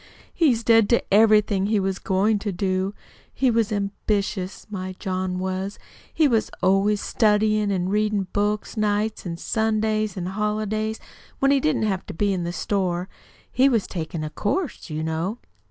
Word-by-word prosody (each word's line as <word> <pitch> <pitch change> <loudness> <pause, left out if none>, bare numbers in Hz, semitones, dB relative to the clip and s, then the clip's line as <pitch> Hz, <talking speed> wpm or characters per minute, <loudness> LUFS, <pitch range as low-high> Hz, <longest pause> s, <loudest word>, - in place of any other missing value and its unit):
"He's 255 -9 +2
dead 225 -2 +5
to 235 - +1
everything 210 -2 +4
he 215 -1 +2
was 190 0 -1
goin' 205 +3 +1
to 205 0 -3
do. 190 +1 -1 0.4
He 260 -1 +2
was 225 -2 +1
ambitious, 200 -1 -2
my 185 -2 -4
John 185 -1 -2
was. 190 +2 -3 0.3
He 315 - +3
was 225 -5 +1
always 195 +2 +3
studyin' 215 0 +2
and 185 -1 -1
readin' 210 -1 +1
books 210 +2 -1
nights 210 -1 -1
an' 170 -1 -4
Sundays 215 0 0
an' 175 - -3
holidays, 215 +2 -2 0.4
when 275 0 +3
he 280 - +4
didn't 155 -4 +1
have 195 -3 -1
to - - -7
be 200 +3 +1
in 180 -2 -2
the 170 - -2
store. 180 -1 -1 0.4
He 265 +3 +4
was 230 -6 +1
takin' 160 -2 -4
a 155 - -4
course, 250 - -2
you 155 0 -3
know." 165 +7 -2
205 Hz, 165 wpm, -24 LUFS, 185-215 Hz, 0.4 s, dead